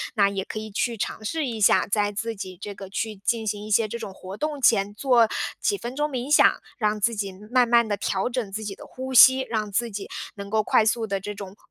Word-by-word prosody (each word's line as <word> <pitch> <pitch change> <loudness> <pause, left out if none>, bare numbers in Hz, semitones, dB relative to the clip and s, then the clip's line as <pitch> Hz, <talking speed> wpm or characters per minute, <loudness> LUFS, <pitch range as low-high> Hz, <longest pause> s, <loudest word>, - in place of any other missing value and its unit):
那 200 -3 +4
也 195 -1 -3
可 215 - -6
以 215 0 -7
去 230 +3 -1
尝 215 - -4
试 315 +7 -2
一 230 -4 -4
下， - - +5
在 205 0 +1
自 225 +2 -4
己 185 -2 -7
这 205 0 -6
个 195 -1 -10
去 215 +2 -3
进 225 +3 -1
行 205 0 -3
一 - - -8
些 215 +1 +3
这 235 - -5
种 195 - -7
活 190 +1 -9
动 300 -2 -3
前， 205 -4 +3
做 240 -1 +3 0.3
几 405 - +1
分 245 -6 -6
钟 295 +1 0
冥 260 +1 -4
想， - - +5 0.2
让 210 -1 0
自 230 +3 +1
己 200 -2 -3
嗯， 210 +3 -14
慢 250 -1 +4
慢 235 -1 +4
地 205 - 0
调 195 +3 -1
整 235 -5 -3
自 215 +3 -5
己 200 -2 -5
的 - - -12
呼 260 +1 -7
吸， 260 +1 +8
让 215 -2 -2
自 235 +4 0
己 200 0 -6 0.3
能 200 0 -8
够 215 0 +2
快 215 - +3
速 225 +1 +1
地 195 -1 -1
这 205 +2 -6
种 200 -1 -9
215 Hz, 275 characters per minute, -24 LUFS, 200-240 Hz, 0.3 s, 吸